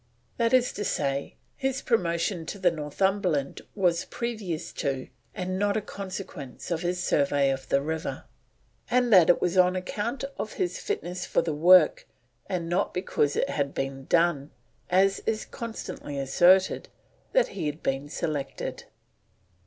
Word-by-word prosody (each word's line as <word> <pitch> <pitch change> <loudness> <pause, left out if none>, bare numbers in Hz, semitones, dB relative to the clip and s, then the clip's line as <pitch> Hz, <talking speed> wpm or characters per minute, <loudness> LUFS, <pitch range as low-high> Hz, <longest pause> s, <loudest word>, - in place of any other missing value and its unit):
That 230 -1 +2
is 255 -1 +3
to 205 - -4
say, 140 -6 -1 0.2
his 270 0 -2
promotion 170 -5 0
to 200 - -5
the 185 -3 +3
Northumberland 165 0 -1
was 175 -4 +1
previous 215 -9 -4
to, 135 -2 -2 0.3
and 185 -1 -3
not 205 +1 +2
a - - 0
consequence 185 -9 -7
of 165 -1 0
his 180 0 -1
survey 140 -1 +2
of 135 0 -5
the 140 - +2
river, 160 +1 -3 0.7
and 245 -2 +3
that 180 -4 +7
it 175 - +5
was 180 +1 +1
on 180 0 +5
account 210 +8 -3 0.2
of 215 - -4
his 180 0 -2
fitness 180 +1 -4
for - - +2
the 165 - -1
work, 170 +2 +5 0.4
and 175 -3 -2
not 180 +4 0
because 150 -5 0
it - - 0
had 140 -2 -1
been 135 0 -3
done, 165 -4 +2 0.4
as 195 +2 +3
is 220 -1 0
constantly 225 -10 -6
asserted, 175 +8 +4 0.4
that - - +4
he 180 -6 -3
had 150 +2 -5
been 135 +2 -1
selected. 145 -3 -4
175 Hz, 155 wpm, -27 LUFS, 150-195 Hz, 0.7 s, that